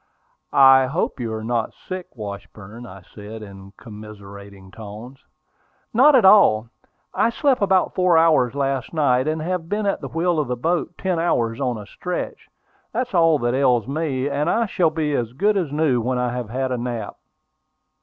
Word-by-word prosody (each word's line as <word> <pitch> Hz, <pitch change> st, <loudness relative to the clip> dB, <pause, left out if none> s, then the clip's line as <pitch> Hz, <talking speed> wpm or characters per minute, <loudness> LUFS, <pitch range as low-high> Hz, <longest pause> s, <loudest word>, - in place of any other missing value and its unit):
"I 135 Hz, -1 st, +6 dB
hope 150 Hz, 0 st, -2 dB
you 115 Hz, -2 st, -3 dB
are 110 Hz, 0 st, -5 dB
not 115 Hz, -1 st, -2 dB
sick, 185 Hz, -1 st, -7 dB
Washburn," 105 Hz, +2 st, -9 dB
I 95 Hz, -2 st, -12 dB
said, 105 Hz, +1 st, -9 dB
in 100 Hz, -1 st, -12 dB
commiserating 100 Hz, -3 st, -12 dB
tones. 110 Hz, +6 st, -10 dB, 0.7 s
"Not 270 Hz, +6 st, +6 dB
at 245 Hz, -, +4 dB
all. 120 Hz, -, +5 dB, 0.4 s
I -, -, +2 dB
slept 265 Hz, +1 st, +1 dB
about 190 Hz, -2 st, +2 dB
four 180 Hz, -2 st, +3 dB
hours 155 Hz, -7 st, +3 dB
last 135 Hz, 0 st, -2 dB
night, 130 Hz, -3 st, +2 dB
and 155 Hz, 0 st, -2 dB
have 175 Hz, -1 st, -3 dB
been 210 Hz, 0 st, -1 dB
at 200 Hz, -, -1 dB
the -, -, -5 dB
wheel 170 Hz, 0 st, 0 dB
of 150 Hz, -, -1 dB
the 125 Hz, -, -2 dB
boat 165 Hz, +8 st, -2 dB
ten 185 Hz, -3 st, -1 dB
hours 120 Hz, -8 st, 0 dB
on 125 Hz, -3 st, -1 dB
a 105 Hz, -, -9 dB
stretch. 180 Hz, -, -6 dB, 0.4 s
That's 250 Hz, -3 st, -3 dB
all 165 Hz, -3 st, +4 dB
that 120 Hz, -, +1 dB
ails 125 Hz, -4 st, +2 dB
me; 140 Hz, -2 st, -2 dB
and 145 Hz, +3 st, -1 dB
I 230 Hz, +4 st, +1 dB
shall 180 Hz, -5 st, +1 dB
be 155 Hz, -2 st, -2 dB
as 120 Hz, -3 st, -2 dB
good 205 Hz, +9 st, +1 dB
as 175 Hz, -8 st, -1 dB
new 145 Hz, -5 st, +1 dB
when 125 Hz, +2 st, -1 dB
I 125 Hz, -1 st, -1 dB
have 125 Hz, -3 st, -5 dB
had 130 Hz, +2 st, -2 dB
a 125 Hz, -, -2 dB
nap." 120 Hz, -3 st, -5 dB
130 Hz, 185 wpm, -21 LUFS, 115-165 Hz, 0.7 s, I